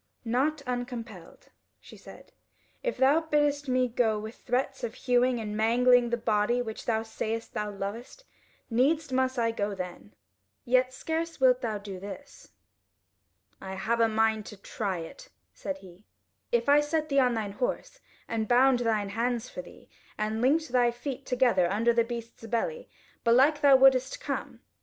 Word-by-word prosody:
"Not 280 Hz, +6 st, 0 dB
uncompelled," 240 Hz, -7 st, -6 dB, 0.3 s
she -, -, -14 dB
said: -, -, -14 dB, 0.5 s
"if -, -, -2 dB
thou 275 Hz, +4 st, +4 dB
biddest 295 Hz, -2 st, 0 dB
me 255 Hz, 0 st, +2 dB
go 230 Hz, -2 st, +1 dB
with 215 Hz, +2 st, -6 dB
threats 265 Hz, +2 st, -2 dB
of 235 Hz, 0 st, -4 dB
hewing 250 Hz, -1 st, +2 dB
and 210 Hz, -1 st, -4 dB
mangling 240 Hz, +2 st, +4 dB
the 235 Hz, -, 0 dB
body 220 Hz, +1 st, +1 dB
which 220 Hz, -3 st, -5 dB
thou 220 Hz, -1 st, 0 dB
sayest 225 Hz, 0 st, -4 dB
thou 210 Hz, 0 st, -2 dB
lovest, 205 Hz, -, -7 dB, 0.4 s
needs 280 Hz, +5 st, +1 dB
must 260 Hz, 0 st, 0 dB
I 230 Hz, -1 st, +1 dB
go 205 Hz, -2 st, -2 dB
then. 175 Hz, -, -8 dB, 0.5 s
Yet 255 Hz, +1 st, +3 dB
scarce 325 Hz, +5 st, -4 dB
wilt 255 Hz, -1 st, +4 dB
thou 220 Hz, -4 st, -2 dB
do 200 Hz, -2 st, -8 dB
this." 205 Hz, +9 st, -10 dB, 1.1 s
"I 190 Hz, 0 st, -6 dB
have 230 Hz, +4 st, -1 dB
a 230 Hz, -, +5 dB
mind 220 Hz, -1 st, +1 dB
to 210 Hz, -, -10 dB
try 200 Hz, -1 st, -4 dB
it," 170 Hz, -, -9 dB, 0.2 s
said 290 Hz, -, -5 dB
he; 185 Hz, -5 st, -16 dB, 0.5 s
"If 475 Hz, -8 st, +1 dB
I 285 Hz, +1 st, +6 dB
set 310 Hz, +1 st, -1 dB
thee 280 Hz, -1 st, +3 dB
on 250 Hz, -2 st, +3 dB
thine 215 Hz, -3 st, -3 dB
horse 255 Hz, -, -3 dB, 0.3 s
and 220 Hz, -1 st, -2 dB
bound 250 Hz, +2 st, +4 dB
thine 220 Hz, -4 st, 0 dB
hands 235 Hz, +2 st, -2 dB
for 180 Hz, -, -6 dB
thee, 175 Hz, -, -16 dB, 0.3 s
and 215 Hz, +1 st, -2 dB
linked 305 Hz, +5 st, +2 dB
thy 245 Hz, -1 st, +3 dB
feet 255 Hz, +3 st, -6 dB
together 245 Hz, -9 st, +2 dB
under 230 Hz, +4 st, +2 dB
the 235 Hz, 0 st, +3 dB
beast's 230 Hz, -1 st, -7 dB
belly; 475 Hz, -, -2 dB, 0.3 s
belike 270 Hz, +6 st, +4 dB
thou 280 Hz, -2 st, +7 dB
wouldest 265 Hz, -, +4 dB
come. -, -, -5 dB
240 Hz, 165 wpm, -28 LUFS, 220-265 Hz, 1.1 s, thou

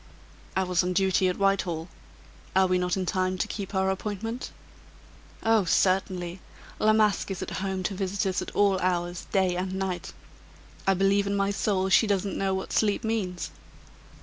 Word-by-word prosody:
"I 190 Hz, -, +2 dB
was 180 Hz, -1 st, +2 dB
on 180 Hz, 0 st, -1 dB
duty 190 Hz, 0 st, +3 dB
at 180 Hz, -, -1 dB
Whitehall. 190 Hz, -5 st, +1 dB, 0.7 s
Are 190 Hz, 0 st, +5 dB
we 185 Hz, 0 st, +2 dB
not 180 Hz, 0 st, 0 dB
in 185 Hz, -, -1 dB
time 185 Hz, +1 st, 0 dB
to -, -, -1 dB
keep 200 Hz, -1 st, -5 dB
our 190 Hz, 0 st, +2 dB
appointment?" 215 Hz, +5 st, -4 dB, 0.9 s
"Oh, 225 Hz, -2 st, +4 dB
certainly! 185 Hz, 0 st, +1 dB, 0.4 s
La 215 Hz, -, +4 dB
Masque 215 Hz, -2 st, +2 dB
is 195 Hz, -, -3 dB
at -, -, -6 dB
home 190 Hz, -1 st, -2 dB
to 195 Hz, -, -1 dB
visitors 190 Hz, -1 st, -1 dB
at -, -, -5 dB
all 200 Hz, -2 st, +3 dB
hours, 175 Hz, -1 st, -1 dB
day 190 Hz, -3 st, +2 dB
and 185 Hz, +1 st, -2 dB
night. 190 Hz, -2 st, -3 dB, 0.8 s
I 195 Hz, -, +4 dB
believe 195 Hz, +2 st, +2 dB
in 200 Hz, -, 0 dB
my 200 Hz, 0 st, +1 dB
soul 195 Hz, -1 st, 0 dB
she 195 Hz, +4 st, +5 dB
doesn't 200 Hz, -1 st, 0 dB
know 195 Hz, -1 st, 0 dB
what 190 Hz, -, -4 dB
sleep 205 Hz, -2 st, +2 dB
means." 205 Hz, -6 st, -2 dB
190 Hz, 175 wpm, -27 LUFS, 185-200 Hz, 0.9 s, Are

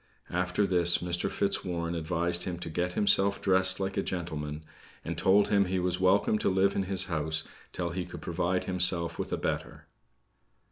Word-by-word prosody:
After 90 Hz, +3 st, 0 dB
this, 85 Hz, -2 st, +4 dB
Mr. 85 Hz, 0 st, -2 dB
Fitzwarren 85 Hz, -4 st, -1 dB
advised 85 Hz, +1 st, -1 dB
him 90 Hz, -2 st, -3 dB
to 80 Hz, -, -5 dB
get 90 Hz, +2 st, -1 dB
himself 100 Hz, 0 st, +3 dB
dressed 95 Hz, -1 st, +2 dB
like 95 Hz, 0 st, -3 dB
a -, -, +2 dB
gentleman; 80 Hz, -5 st, -4 dB, 0.4 s
and -, -, -3 dB
told 100 Hz, +2 st, +3 dB
him 100 Hz, -1 st, +3 dB
he 95 Hz, +1 st, -1 dB
was 90 Hz, 0 st, 0 dB
welcome 100 Hz, +3 st, +3 dB
to -, -, +1 dB
live 95 Hz, +1 st, +2 dB
in 95 Hz, -, 0 dB
his 95 Hz, -1 st, -1 dB
house 80 Hz, -2 st, 0 dB, 0.3 s
till 85 Hz, -1 st, -3 dB
he 90 Hz, +1 st, -3 dB
could 90 Hz, -3 st, -10 dB
provide 90 Hz, +2 st, -1 dB
himself 90 Hz, -2 st, +1 dB
with -, -, -4 dB
a -, -, 0 dB
better. -, -, -4 dB
90 Hz, 180 wpm, -29 LUFS, 85-95 Hz, 0.4 s, this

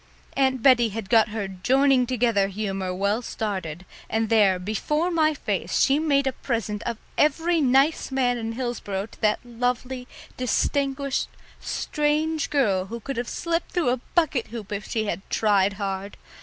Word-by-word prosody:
Aunt 260 Hz, -3 st, +1 dB
Bettie 240 Hz, -4 st, +6 dB
had 215 Hz, 0 st, -6 dB
got 225 Hz, -2 st, +6 dB
her 210 Hz, -2 st, -3 dB
joining 255 Hz, +7 st, +2 dB
together 235 Hz, -5 st, +2 dB
humour 195 Hz, -2 st, -3 dB
well 200 Hz, +5 st, 0 dB
started, 185 Hz, -8 st, -4 dB, 0.2 s
and 220 Hz, 0 st, 0 dB
there, 205 Hz, -5 st, +4 dB
before 300 Hz, -, -1 dB
my 310 Hz, -2 st, +2 dB
face, -, -, -2 dB
she 275 Hz, +2 st, +4 dB
made 280 Hz, -3 st, +2 dB
a 265 Hz, -, +1 dB
present 225 Hz, -5 st, -3 dB
of 235 Hz, -2 st, -2 dB, 0.2 s
every 325 Hz, +3 st, +3 dB
nice 275 Hz, +3 st, +3 dB
man 250 Hz, -2 st, +1 dB
in 225 Hz, 0 st, -3 dB
Hillsboro 225 Hz, -5 st, -3 dB
to 220 Hz, -, -18 dB
that 215 Hz, +3 st, +1 dB
lovely, 250 Hz, +1 st, -2 dB, 0.3 s
distinguished, 275 Hz, +2 st, 0 dB, 0.3 s
strange 305 Hz, +1 st, -1 dB
girl 200 Hz, -10 st, +1 dB
who 230 Hz, +4 st, -6 dB
could 270 Hz, +3 st, -5 dB
have 240 Hz, 0 st, -2 dB
slipped 335 Hz, 0 st, -2 dB
through 345 Hz, -8 st, +1 dB
a 250 Hz, -, +1 dB, 0.2 s
bucket 315 Hz, -8 st, +2 dB
hoop 220 Hz, -3 st, -8 dB
if 205 Hz, 0 st, -4 dB
she 220 Hz, -1 st, -1 dB
had 205 Hz, -, -3 dB
tried 200 Hz, -2 st, +2 dB
hard. 195 Hz, 0 st, -4 dB
240 Hz, 160 wpm, -25 LUFS, 205-275 Hz, 0.3 s, Bettie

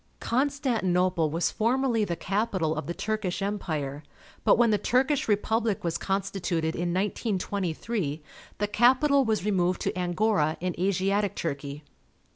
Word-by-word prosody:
Constantinople 195 Hz, -, +1 dB
was 165 Hz, +3 st, 0 dB
formerly 235 Hz, 0 st, +1 dB
the 175 Hz, -4 st, -1 dB
capital 190 Hz, -4 st, -1 dB
of -, -, -4 dB
the 170 Hz, -, -2 dB
Turkish 215 Hz, -4 st, -2 dB
Empire, 155 Hz, -9 st, -3 dB, 0.4 s
but, -, -, +5 dB
when 235 Hz, -1 st, +4 dB
the 210 Hz, -, +2 dB
Turkish 260 Hz, +6 st, +1 dB
Republic 220 Hz, 0 st, +1 dB
was 170 Hz, -1 st, -1 dB
consti 195 Hz, 0 st, -2 dB
tuted 165 Hz, -2 st, 0 dB
in 175 Hz, 0 st, -2 dB
1923, 190 Hz, -4 st, -2 dB, 0.3 s
the 205 Hz, -, 0 dB
capital 265 Hz, +6 st, +4 dB
was 220 Hz, -5 st, 0 dB
removed 185 Hz, -3 st, +1 dB
to -, -, -1 dB
Angora 180 Hz, -3 st, +1 dB
in 180 Hz, 0 st, -2 dB
Asiatic 195 Hz, +2 st, +1 dB
Turkey. 140 Hz, -1 st, -4 dB
195 Hz, 135 wpm, -27 LUFS, 175-220 Hz, 0.4 s, but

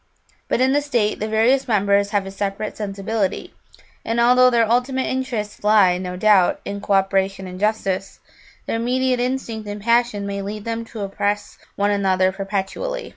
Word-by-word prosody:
But -, -, 0 dB
in 260 Hz, +1 st, +4 dB
the 290 Hz, -, +3 dB
state 240 Hz, -7 st, 0 dB
the 215 Hz, -, -2 dB
various 230 Hz, +5 st, +2 dB
members 200 Hz, -2 st, +2 dB
have 205 Hz, -1 st, 0 dB
a 195 Hz, -, -7 dB
separate 200 Hz, +1 st, -4 dB
sensibility, 200 Hz, 0 st, -3 dB, 0.5 s
and, 230 Hz, +1 st, -1 dB
although 250 Hz, +1 st, +6 dB
their 235 Hz, -2 st, +2 dB
ultimate 250 Hz, +3 st, +1 dB
interests 245 Hz, -7 st, -3 dB
lie, 205 Hz, -4 st, +4 dB
no 180 Hz, -1 st, -5 dB
doubt, 195 Hz, -2 st, +4 dB
in 200 Hz, 0 st, -5 dB
co 200 Hz, -, -1 dB
operation 195 Hz, 0 st, +1 dB
and 185 Hz, 0 st, -8 dB
justice, 195 Hz, -2 st, -1 dB, 0.5 s
their -, -, -2 dB
immediate 250 Hz, +2 st, 0 dB
instinct 245 Hz, -4 st, -3 dB
and 205 Hz, 0 st, -5 dB
passion 235 Hz, -1 st, +1 dB
may 200 Hz, 0 st, -3 dB
lead 205 Hz, +1 st, -6 dB
them 230 Hz, 0 st, -3 dB
to 225 Hz, -1 st, -8 dB
oppress 205 Hz, +1 st, -3 dB, 0.2 s
one 205 Hz, +1 st, +1 dB
another 190 Hz, -2 st, +2 dB
perpetually. 200 Hz, -, -4 dB
210 Hz, 170 wpm, -21 LUFS, 195-235 Hz, 0.5 s, although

